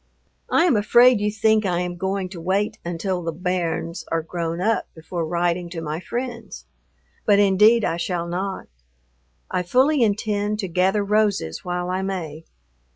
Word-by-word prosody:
I -, -, +4 dB
am 335 Hz, -, +3 dB
afraid 235 Hz, +2 st, +5 dB
you 210 Hz, -, +1 dB
think 220 Hz, 0 st, +2 dB
I 180 Hz, -3 st, 0 dB
am 180 Hz, 0 st, -3 dB
going 190 Hz, +1 st, -2 dB
to 175 Hz, -3 st, -9 dB
wait 195 Hz, +4 st, -1 dB
until 175 Hz, +2 st, -2 dB
the 165 Hz, -1 st, -3 dB
"bairns" 170 Hz, 0 st, -2 dB
are 165 Hz, -1 st, 0 dB
grown 165 Hz, 0 st, -4 dB
up 220 Hz, +5 st, 0 dB
before 165 Hz, 0 st, -4 dB
writing 175 Hz, +1 st, -1 dB
to 170 Hz, -1 st, -6 dB
my 155 Hz, 0 st, -4 dB
friends, 235 Hz, -, -6 dB, 0.6 s
but 205 Hz, -2 st, +4 dB
indeed 205 Hz, +3 st, +5 dB
I 165 Hz, -, -1 dB
shall 170 Hz, 0 st, -2 dB
not. 190 Hz, +3 st, -3 dB, 0.9 s
I 180 Hz, -, 0 dB
fully 260 Hz, -, +2 dB
intend 210 Hz, -1 st, 0 dB
to 205 Hz, -3 st, -3 dB
"gather 185 Hz, +4 st, +1 dB
roses 200 Hz, -, 0 dB
while 180 Hz, 0 st, -3 dB
I 185 Hz, +1 st, -1 dB
may." 165 Hz, -5 st, -5 dB
185 Hz, 160 wpm, -22 LUFS, 170-210 Hz, 0.9 s, afraid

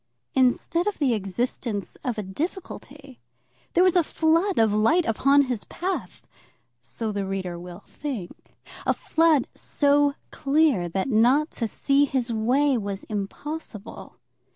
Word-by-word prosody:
Instead 265 Hz, +8 st, +2 dB
of 415 Hz, -, -1 dB
the 270 Hz, -5 st, +2 dB
existence 205 Hz, +1 st, -3 dB
of 245 Hz, -3 st, -2 dB
a 210 Hz, -, -2 dB
difficulty, 280 Hz, -, -6 dB, 0.6 s
there 355 Hz, -, +6 dB
was 370 Hz, -1 st, +4 dB
a 355 Hz, -, +6 dB
flood 330 Hz, +5 st, +1 dB
of 220 Hz, -2 st, +4 dB
light 270 Hz, +12 st, +3 dB
upon 275 Hz, +5 st, +4 dB
his 250 Hz, -5 st, -3 dB
path, 375 Hz, +2 st, -5 dB, 0.5 s
so 225 Hz, -2 st, -4 dB
the 200 Hz, -1 st, -2 dB
reader 190 Hz, -3 st, -4 dB
will 175 Hz, 0 st, -10 dB
think; 250 Hz, -12 st, -7 dB, 0.3 s
a -, -, +3 dB
flood 320 Hz, -5 st, +2 dB
so 285 Hz, 0 st, +2 dB, 0.2 s
clear 280 Hz, -, +2 dB
that 190 Hz, +6 st, -2 dB
not 255 Hz, +7 st, +3 dB
to 230 Hz, -, -2 dB
see 280 Hz, +5 st, +2 dB
his 260 Hz, -4 st, -2 dB
way 260 Hz, +6 st, +2 dB
was 200 Hz, -2 st, -5 dB
impossible. 215 Hz, +2 st, -6 dB
255 Hz, 135 wpm, -25 LUFS, 210-300 Hz, 0.6 s, there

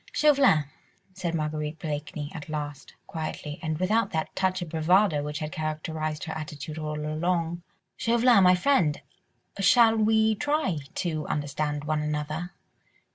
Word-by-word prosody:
"Chauvelin," 275 Hz, -, +4 dB, 0.5 s
said 175 Hz, -3 st, -3 dB
Marguerite 155 Hz, 0 st, -2 dB
Blakeney 150 Hz, -1 st, -5 dB
at 155 Hz, -1 st, -8 dB
last, 145 Hz, -2 st, -5 dB
quietly, 155 Hz, -2 st, -5 dB
and 155 Hz, -2 st, -2 dB
without 215 Hz, +6 st, +1 dB
that 160 Hz, -1 st, -3 dB
touch 185 Hz, -1 st, 0 dB
of 170 Hz, -, -8 dB
bravado 165 Hz, +1 st, +3 dB
which 150 Hz, +1 st, -4 dB
had 155 Hz, -1 st, -4 dB
characterised 155 Hz, 0 st, -3 dB
her 160 Hz, -, -4 dB
attitude 155 Hz, -1 st, -6 dB
all 150 Hz, -1 st, -3 dB
along, 165 Hz, +2 st, -1 dB, 0.4 s
"Chauvelin, 235 Hz, -2 st, +4 dB
my 180 Hz, 0 st, +7 dB
friend, 180 Hz, -, +2 dB, 0.6 s
shall 225 Hz, +3 st, +6 dB
we 220 Hz, 0 st, +3 dB
try 290 Hz, -, 0 dB, 0.2 s
to 155 Hz, -4 st, -2 dB
understand 145 Hz, 0 st, -2 dB
one 155 Hz, 0 st, 0 dB
another. 150 Hz, +3 st, -3 dB
160 Hz, 135 wpm, -27 LUFS, 150-185 Hz, 0.6 s, my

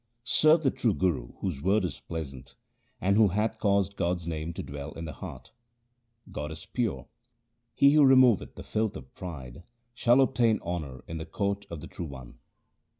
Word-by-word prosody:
Serve 155 Hz, +5 st, +4 dB
the 135 Hz, -, +3 dB
true 110 Hz, -6 st, 0 dB
Guru 85 Hz, -10 st, -1 dB
whose 85 Hz, -8 st, -3 dB
word 95 Hz, +3 st, +2 dB
is 85 Hz, -, -5 dB
pleasant, 70 Hz, -5 st, -7 dB, 0.4 s
And 100 Hz, +2 st, +2 dB
who 110 Hz, -1 st, +6 dB
hath 105 Hz, +3 st, -1 dB
caused 100 Hz, -1 st, +1 dB
God's 85 Hz, -1 st, -1 dB
name 80 Hz, 0 st, -3 dB
to -, -, -5 dB
dwell 70 Hz, 0 st, -7 dB
in 80 Hz, -, -6 dB
the 80 Hz, -, -6 dB
heart. 65 Hz, -, -9 dB, 0.8 s
God 75 Hz, +1 st, -4 dB
is 80 Hz, -, -8 dB
pure: 100 Hz, -, -2 dB, 0.7 s
he 140 Hz, -, +6 dB
who 150 Hz, -1 st, +6 dB
removeth 130 Hz, -5 st, +5 dB
the -, -, -8 dB
filth 110 Hz, -1 st, -1 dB
of 65 Hz, -, -13 dB
pride 75 Hz, -6 st, -8 dB, 0.3 s
shall 120 Hz, +1 st, +4 dB
obtain 115 Hz, -5 st, +3 dB
honour 75 Hz, -7 st, -5 dB
in 80 Hz, 0 st, -5 dB
the 80 Hz, -, -5 dB
court 100 Hz, 0 st, -2 dB
of 85 Hz, -3 st, -6 dB
the -, -, -8 dB
True 85 Hz, -, -6 dB
One. 65 Hz, -4 st, -11 dB
90 Hz, 180 wpm, -28 LUFS, 75-110 Hz, 0.8 s, who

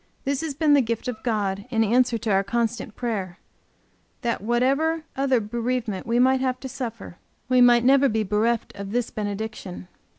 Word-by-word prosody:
This 280 Hz, 0 st, -1 dB
has 315 Hz, -4 st, -4 dB
been 300 Hz, 0 st, +3 dB
the 285 Hz, -, +6 dB
gift 230 Hz, +1 st, -3 dB
of 230 Hz, -3 st, -4 dB
God 200 Hz, -4 st, -1 dB
in 225 Hz, -2 st, +2 dB
answer 240 Hz, +2 st, +2 dB
to 220 Hz, -1 st, -2 dB
our 195 Hz, 0 st, +3 dB
constant 235 Hz, 0 st, -2 dB
prayer, 195 Hz, -7 st, -3 dB, 0.8 s
that 235 Hz, -5 st, -1 dB
whatever 275 Hz, +8 st, +1 dB
other 265 Hz, -2 st, +2 dB
bereavement 230 Hz, -1 st, -3 dB
we 230 Hz, +1 st, +1 dB
might 260 Hz, +1 st, +4 dB
have 255 Hz, -1 st, -1 dB
to 265 Hz, -, -5 dB
suffer, 240 Hz, -8 st, -7 dB, 0.3 s
we 255 Hz, -1 st, +4 dB
might 240 Hz, -1 st, +6 dB
never 275 Hz, +2 st, +5 dB
be 220 Hz, -1 st, 0 dB
bereft 215 Hz, +3 st, 0 dB
of 200 Hz, 0 st, -7 dB
this 245 Hz, -1 st, -1 dB
benediction. 205 Hz, -3 st, -5 dB
235 Hz, 175 wpm, -24 LUFS, 215-255 Hz, 0.8 s, the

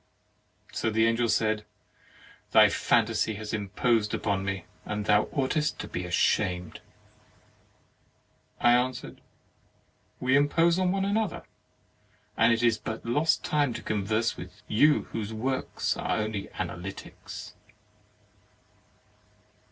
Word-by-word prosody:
So -, -, -1 dB
the 110 Hz, +1 st, +2 dB
Angel 115 Hz, +1 st, +2 dB
said; 110 Hz, -1 st, +1 dB, 0.9 s
"Thy -, -, +8 dB
phantasy 110 Hz, -, +1 dB
has 105 Hz, +1 st, -6 dB
imposed 105 Hz, +1 st, 0 dB
upon 100 Hz, -2 st, -1 dB
me, 95 Hz, -2 st, -3 dB, 0.2 s
and 105 Hz, 0 st, -4 dB
thou 105 Hz, 0 st, +4 dB
ought 135 Hz, -3 st, -1 dB
est 150 Hz, 0 st, 0 dB
to -, -, -6 dB
be 90 Hz, -, -4 dB
ashamed." 90 Hz, 0 st, 0 dB, 1.8 s
I 120 Hz, -, +5 dB
answered: 125 Hz, +1 st, 0 dB, 1.0 s
"We 130 Hz, +1 st, +2 dB
impose 165 Hz, +5 st, +3 dB
on 185 Hz, -1 st, +2 dB
one 195 Hz, 0 st, 0 dB
another, 210 Hz, +1 st, -1 dB, 0.9 s
and 115 Hz, +1 st, +4 dB
it 115 Hz, +1 st, +1 dB
is 115 Hz, -2 st, +3 dB
but 110 Hz, +1 st, -6 dB
lost 145 Hz, +7 st, +1 dB
time 145 Hz, -4 st, +1 dB
to -, -, -6 dB
con 105 Hz, -2 st, -1 dB
verse 110 Hz, +3 st, 0 dB
with 95 Hz, +4 st, -11 dB
you 145 Hz, +8 st, +4 dB
whose 110 Hz, -1 st, -4 dB
works 130 Hz, +4 st, -2 dB
are -, -, -1 dB
only 105 Hz, -2 st, -3 dB
Analytics.' 95 Hz, +3 st, -7 dB
110 Hz, 120 wpm, -28 LUFS, 105-130 Hz, 1.8 s, Thy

